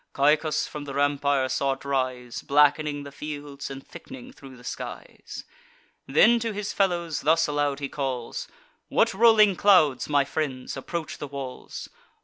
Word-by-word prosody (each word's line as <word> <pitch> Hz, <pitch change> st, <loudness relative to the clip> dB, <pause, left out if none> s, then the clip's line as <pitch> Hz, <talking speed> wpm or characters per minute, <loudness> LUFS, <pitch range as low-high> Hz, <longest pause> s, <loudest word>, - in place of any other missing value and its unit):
Caicus 150 Hz, +2 st, +2 dB
from 150 Hz, -1 st, -7 dB
the 140 Hz, -1 st, -7 dB
rampire 140 Hz, -1 st, +1 dB
saw 135 Hz, +1 st, 0 dB
it 135 Hz, +1 st, -12 dB
rise, 130 Hz, -3 st, -2 dB
Black'ning 145 Hz, 0 st, +2 dB
the 140 Hz, -, -9 dB
fields, 145 Hz, -1 st, -7 dB
and 135 Hz, 0 st, -9 dB
thick'ning 260 Hz, -1 st, -11 dB
thro' 135 Hz, -, -13 dB
the 125 Hz, -, -16 dB
skies. -, -, -8 dB, 0.6 s
Then 235 Hz, 0 st, +5 dB
to 230 Hz, -1 st, -3 dB
his 205 Hz, 0 st, -4 dB
fellows 175 Hz, -5 st, 0 dB
thus 165 Hz, +3 st, +3 dB
aloud 145 Hz, -1 st, -1 dB
he 140 Hz, -, -3 dB
calls: 130 Hz, -4 st, -4 dB, 0.4 s
"What -, -, +2 dB
rolling 215 Hz, -2 st, +6 dB
clouds, 165 Hz, -11 st, +4 dB
my 145 Hz, -1 st, +3 dB
friends, 135 Hz, -3 st, -3 dB
approach 160 Hz, +4 st, -5 dB
the 145 Hz, -, -5 dB
walls? 135 Hz, -2 st, -7 dB
145 Hz, 150 wpm, -26 LUFS, 135-165 Hz, 0.6 s, rolling